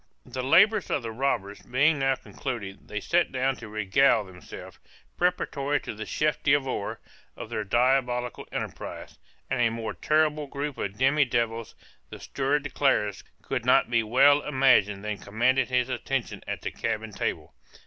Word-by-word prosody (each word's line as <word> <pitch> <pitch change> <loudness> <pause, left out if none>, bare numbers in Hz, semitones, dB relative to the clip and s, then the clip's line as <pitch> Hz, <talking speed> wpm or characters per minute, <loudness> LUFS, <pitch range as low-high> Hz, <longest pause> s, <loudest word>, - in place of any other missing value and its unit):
The 130 - -5
labors 190 - +4
of 140 - -1
the 115 - -4
robbers 110 -5 -2
being 140 +4 +2
now 135 0 +2
concluded, 110 -8 -7
they 105 - -4
sat 175 +9 +1
down 130 +1 0
to 115 - -9
regale 110 +3 +3
themselves, 90 -3 -11 0.4
preparatory 145 -5 0
to - - -6
the 110 +1 -7
chef 150 0 0
d'oeuvre 135 -7 0 0.4
of - - -8
their 110 - -2
diabolical 125 +2 +1
enterprise; - - -6 0.3
and 135 -2 -1
a 115 - +4
more 115 -1 -4
terrible 155 -1 +1
group 140 +1 -5
of 100 0 -4
demi 140 +3 +3
devils, 115 -2 -2 0.3
the - - -9
steward 140 +2 -1
declares, 135 -8 0 0.2
could - - -3
not - - +3
be 120 -1 +3
well 135 +6 +5
imagined 125 -9 +3
than 105 -1 -3
commanded 125 +6 +1
his 125 -1 +1
attention 130 0 -3
at - - -4
the - - -3
cabin 110 -1 -3
table. - - -4
130 Hz, 160 wpm, -27 LUFS, 110-140 Hz, 0.4 s, well